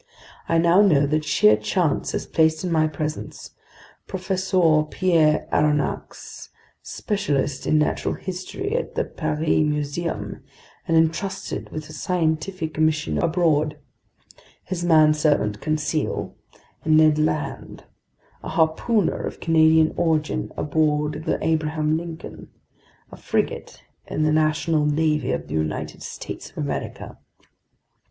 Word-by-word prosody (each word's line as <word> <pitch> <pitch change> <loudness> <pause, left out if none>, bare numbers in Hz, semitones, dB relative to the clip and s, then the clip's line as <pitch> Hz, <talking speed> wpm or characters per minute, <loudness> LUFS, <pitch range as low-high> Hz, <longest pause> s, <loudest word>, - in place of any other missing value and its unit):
I 165 - +3
now 170 +4 +5
know 155 -9 +4
that 155 +2 0
sheer 105 -7 +4
chance 145 - -1
has - - -2
placed 160 +1 +2
in 180 - -2
my 155 -1 +3
presence 155 0 -5 0.6
Professor 185 -4 +1
Pierre 160 -4 +2
Aronnax, 150 -1 -1 0.3
specialist 145 - -2
in 155 - +3
natural 150 - 0
history 190 - -5
at - - -3
the - - +1
Paris 155 -1 -3 0.2
Museum 150 -7 -3 0.5
and 165 - +3
entrusted 165 +4 -1
with 155 0 -7
a 155 - -11
scientific 160 -1 -2
mission 155 -1 +1
abroad, 160 -3 +1 0.9
his 180 -2 -4
manservant 155 -9 +3
Conseil, 155 0 -2 0.5
and 155 0 +4
Ned 155 -1 +5
Land, 155 0 -2 0.6
a - - -7
harpooner 165 +7 +1
of - - -8
Canadian 160 -1 +4
origin 160 -3 0
aboard 150 0 0
the - - 0
Abraham 155 -1 0
Lincoln, 165 0 -7 0.6
a - - -10
frigate - - -3 0.2
in 155 - -1
the 155 0 +2
national 155 0 +1
navy 150 0 +1
of - - -3
the - - -7
United 80 -1 -3
States - - -7
of - - -25
America." - - -5
155 Hz, 120 wpm, -23 LUFS, 150-165 Hz, 0.9 s, now